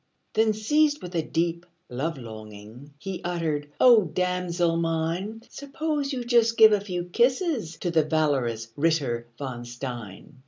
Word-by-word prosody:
Then, 220 0 +3
seized 295 +8 +2
with 180 0 -7
a 165 - +1
deep 170 +2 -1 0.2
love 145 +6 -3
longing, 110 +3 -11
He 190 +4 -6
uttered, 160 -4 -2
"O 235 -6 +7
damosel 175 0 0
mine, 170 +7 -2
Suppose 290 0 -3
you 255 -3 -3
just 235 -1 +3
give 220 -1 +9
a 205 -2 +3
few 180 -3 -3
kisses 240 - 0
To 175 - -2
the 160 -2 +3
valorous 135 -8 0
Ritter 140 -7 0
von 130 -4 -5
Stein!" 120 0 -8
170 Hz, 145 wpm, -26 LUFS, 140-220 Hz, 0.2 s, give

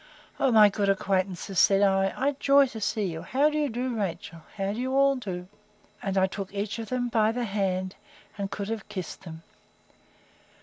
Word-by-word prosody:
O 270 - +3
my 215 -2 +8
good 200 0 0
old 195 - +3
acquaintances, 190 -1 -1
said 195 0 +5
I, 195 -1 +3
I 275 +2 +1
joy 280 0 +5
to 240 -4 -8
see 210 +1 -1
you! 165 -3 -4
How 275 - +2
do 305 - -2
you 295 -2 0
do, 245 +1 -3
Rachel? 175 -5 -4 0.2
How 195 0 -1
do 220 - -5
you 260 +1 -1
all 275 0 +4
do? 185 -8 -6 0.5
And 195 -1 -2
I 190 - +5
took 190 0 -6
each 205 +3 -3
of 225 - -6
them 250 -1 -1
by 220 -2 +2
the 245 +1 -2
hand, 190 -2 -2 0.4
and 200 -1 -4
could 200 +1 -5
have 225 -3 -5
kissed 185 -2 -6
them. 160 -1 -9
205 Hz, 205 wpm, -27 LUFS, 195-245 Hz, 0.5 s, my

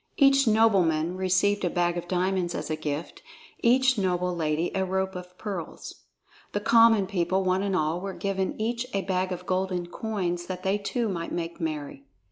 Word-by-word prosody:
Each 275 -2 +5
nobleman 185 -7 +3
received 190 +2 +1
a 175 - +2
bag 175 0 +1
of 175 0 -5
diamonds 180 -1 0
as - - -4
a - - +1
gift, 155 0 -5 0.4
each 260 0 +3
noble 180 -1 0
lady 160 0 0
a 190 - 0
rope 190 0 -1
of 180 0 -9
pearls. 195 -6 -7 0.5
The 205 - 0
common 225 -1 +5
people, 185 0 0
one 185 0 +1
and 195 -1 0
all, 160 +1 0
were 195 0 -4
given 195 0 -2
each 235 +3 -1
a 195 - 0
bag 185 0 -1
of 180 0 -5
golden 185 -1 -1
coins 175 -3 -3
that 185 -1 -5
they 195 +2 +1
too 230 +3 -1
might 170 -4 -4
make 170 +1 -4
merry. 150 -3 -4
185 Hz, 180 wpm, -27 LUFS, 175-200 Hz, 0.5 s, Each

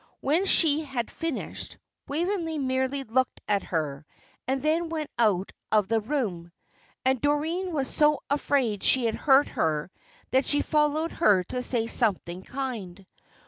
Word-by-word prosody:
When 325 +8 +1
she 315 -3 +4
had 265 -5 -4
finished, 330 -5 -5 0.3
Waveney 330 +1 -1
merely 260 0 -1
looked 260 +2 0
at 205 -1 +2
her, 150 -4 -2 0.4
and 265 +1 -1
then 325 +2 +1
went 310 -2 -4
out 200 -5 +2 0.2
of 210 -2 +3
the 225 0 +3
room. 205 - -3 0.5
And 260 -1 +2
Doreen 320 +6 0
was 280 -5 -1
so 300 +2 +2
afraid 275 -7 0
she 255 -2 +3
had 225 - +1
hurt 275 +2 +4
her 155 +2 -1 0.4
that 260 +1 +3
she 290 0 +1
followed 305 +2 +1
her 200 - +3
to 250 +7 -4
say 240 -2 +1
something 190 -6 0
kind. 210 -7 -6
265 Hz, 145 wpm, -27 LUFS, 215-300 Hz, 0.5 s, she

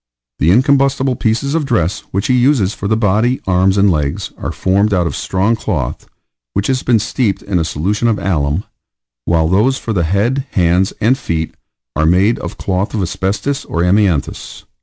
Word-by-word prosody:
The 80 - +2
incombustible 135 +3 +3
pieces 120 +6 -1
of 165 -1 +1
dress 100 - 0
which 100 +1 -2
he 130 - +2
uses 125 -6 +2
for 100 - -5
the 110 +1 +1
body, 110 +4 +1
arms, 95 +1 +2
and 100 0 +4
legs, 75 -4 -2
are - - -5
formed 100 +2 +1
out 90 -1 +1
of 85 - -3
strong 100 +5 0
cloth, 80 - -3 0.5
which 100 - 0
has 130 -1 0
been 120 -2 +3
steeped 105 0 -1
in 95 -3 -1
a - - +1
solution 100 +10 -1
of 115 -2 +1
alum, 80 -2 -1 0.6
while 80 -2 +2
those 110 +10 +2
for 115 - -4
the 90 - +1
head, 120 - 0
hands, 90 +1 +2
and 125 +5 +2
feet, 80 -9 -3 0.4
are 80 0 +2
made 95 +7 +3
of - - -7
cloth 95 +4 -2
of 105 - 0
asbestos 100 - -2
or 85 - -1
amianthus. 90 -4 0
100 Hz, 180 wpm, -16 LUFS, 90-120 Hz, 0.6 s, and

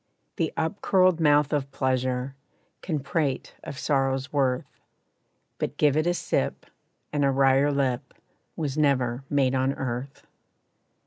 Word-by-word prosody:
The 165 -5 0
up 160 +6 -2
curled 185 -3 +3
mouth 150 -2 +3
of 140 -2 0
pleasure, 130 -1 -1 0.5
Can 155 -5 -2
prate 145 -1 -2
of 140 - -7
sorrow's 135 -2 0
worth, 130 -3 +1 0.9
But - - -3
give 145 -2 +3
it 155 +2 +1
a 175 - +2
sip, - - -1 0.5
and 145 -1 +1
a 140 - +4
wryer 135 +1 +3
lip, 135 -3 -1 0.4
Was 150 -2 -2
never 130 -4 +1
made 135 -3 +2
on 130 +1 +1
earth. 130 +1 -5
140 Hz, 135 wpm, -26 LUFS, 130-150 Hz, 0.9 s, a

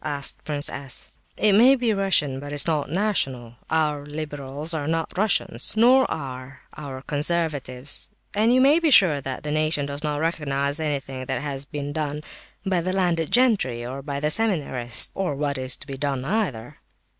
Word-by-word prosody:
asked 145 -2 -2
Prince 145 -1 -3
S. 135 -2 -5 0.3
"It 210 -2 +3
may 245 +7 +7
be 240 -4 0
Russian, 190 -9 +2
but 145 +1 -8
it - - -3
is 145 - +6
not 155 -4 0
national. 135 - -1
Our 150 -2 0
liberals 145 0 -3
are 145 -3 -2
not 165 0 -2
Russian, 195 - 0 0.2
nor 250 +4 +5
are 130 -2 -6
our 135 -3 -7
conservatives, 145 -4 -1 0.2
and 220 +3 +3
you 255 +1 +4
may 285 +5 +5
be 330 -2 +2
sure 175 - +6
that 135 +1 -5
the 150 - -3
nation 155 -1 +1
does 140 +1 -5
not 150 -1 -1
recognize 145 -2 -1
anything 135 -4 -3
that 135 +1 -2
has 140 -1 -4
been 145 +1 -5
done 150 -1 -3 0.4
by 185 -3 +1
the 185 +2 -2
landed 175 -4 0
gentry, 200 - +2
or 130 +3 -6
by 140 0 -4
the 150 +1 0
seminarists, 145 - +1
or 185 -7 -2
what 140 -1 -2
is 130 0 +1
to - - -9
be 135 -1 -7
done 135 -2 -2
either." 145 - -2
150 Hz, 180 wpm, -24 LUFS, 135-175 Hz, 0.4 s, may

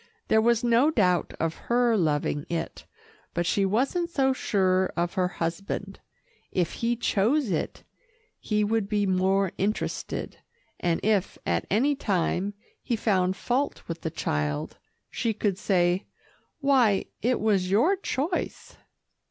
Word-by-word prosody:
There 220 - +5
was 235 +1 +2
no 240 +5 +4
doubt 185 - +1
of 165 0 0 0.2
her 240 -1 +3
loving 145 -5 0
it, 165 -1 -4 0.5
but 175 0 0
she 195 +2 +2
wasn't 275 - 0
so 270 -5 +2
sure 190 -6 +1
of 170 +1 0
her 185 -1 +1
husband. 180 +3 -4 0.5
If 175 -3 0
he 235 +1 0
chose 235 +3 +1
it, 160 - -3 0.6
he 210 -1 0
would 210 -1 0
be 205 -1 +1
more 190 0 +2
interested, 205 +3 -2 0.4
and 170 -2 +1
if 205 -3 +1
at - - 0
any 260 +9 +3
time 195 -4 -1 0.3
he 240 - -1
found 190 -4 +1
fault 255 +7 -2
with 165 0 -5
the 160 - -2
child, 75 - -2 0.3
she 225 -2 -1
could 200 -3 -1
say, 180 -1 +1 0.5
"Why, 255 -8 +3 0.2
it 245 +2 +1
was 200 -4 +1
your 240 - +4
choice." 345 -2 -3
200 Hz, 135 wpm, -26 LUFS, 180-235 Hz, 0.6 s, There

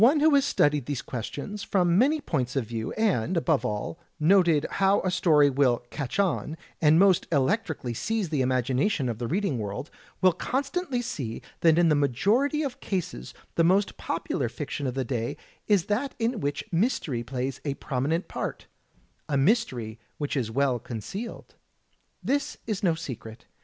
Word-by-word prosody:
One 270 +7 +6
who 310 +1 +5
has 280 -1 +5
studied 145 - +2
these 145 -4 -3
questions 145 - -5
from 175 -4 +2
many 285 - +3
points 135 - -2
of 135 -4 0
view, 115 0 -4
and, 185 - +1
above 160 -3 +2
all, 105 -5 -3 0.2
noted 165 -2 +4 0.2
how 195 +1 +4
a 185 - 0
story 160 -5 +4
will 130 -3 +2
"catch 145 +1 -4
on," 175 -5 0 0.2
and 155 -1 +6
almost 190 +1 +4
electrically 145 - 0
seize 215 - -1
the 150 -4 0
imagination 130 - +1
of 115 -2 -3
the 120 - -2
reading 180 - 0
world, 105 +7 -5 0.3
will 185 -1 +5
constantly 270 - -2
see 130 - -5 0.2
that 165 -1 +5
in 170 -1 +5
the - - +5
majority 205 - +2
of 275 -4 -4
cases 170 - -4 0.2
the 165 - +3
most 190 +4 +3
popular 135 -6 -2
fiction 140 +2 -4
of 125 - -3
the 135 -1 -1
day 120 +3 -2 0.3
is 200 -5 +3
that 240 +7 -1
in 230 0 0
which 145 -4 -2
mystery 165 - 0
plays 130 +2 -4
a 140 -2 -2
prominent 145 +7 -1
part - - -4 0.3
— - - -38
a 145 - +1
mystery 135 - +1 0.2
which 145 -1 -2
is 125 -6 -1
well 130 +1 +1
concealed. 130 - -7 0.7
This 285 +1 -1
is 215 -4 -2
no 175 -5 +2
secret. 115 -8 -8
155 Hz, 170 wpm, -27 LUFS, 130-200 Hz, 0.7 s, One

